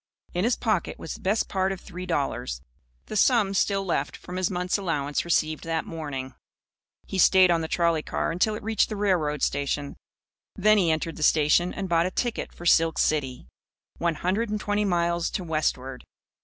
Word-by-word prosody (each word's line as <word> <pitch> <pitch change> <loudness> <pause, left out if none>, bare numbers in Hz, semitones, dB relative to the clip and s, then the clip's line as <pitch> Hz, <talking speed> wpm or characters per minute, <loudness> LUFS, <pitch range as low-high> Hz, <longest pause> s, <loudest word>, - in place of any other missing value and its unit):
In 180 +3 0
his 240 - +2
pocket 215 -7 -1
was 160 - -6
the - - -10
best 205 +4 +1
part 190 0 0
of 190 - -4
three 185 0 -8
dollars, 100 - -2 0.4
the - - -7
sum 215 -3 +3
still 195 0 +1
left 175 - -1
from 180 +1 -8
his 185 -1 0
month's 180 +1 -1
allowance 150 -6 -1
received 155 -2 0
that 165 0 -1
morning. 140 -5 -6 0.7
He 190 - -4
stayed 185 -1 +6
on 165 -1 +2
the 160 - -3
trolley 170 -1 +1
car - - -2
until 195 +6 +1
it 215 - -8
reached 220 -1 +1
the 215 - -4
railroad 170 -8 0
station. 140 0 -1 0.6
Then 215 +2 +4
he 175 -4 +2
entered 160 +1 -1
the - - -8
station 155 +4 +3
and 195 -2 -4
bought 170 0 +2
a - - -1
ticket 240 +5 -3
for 175 - -12
Silk 165 -1 +4
City 135 -5 0 0.5
one 170 -1 0
hundred 195 +8 -1
and 210 0 -2
twenty 205 0 0
miles 170 -2 +1
to 185 - -3
westward. 135 -5 -2
175 Hz, 190 wpm, -26 LUFS, 155-195 Hz, 0.7 s, stayed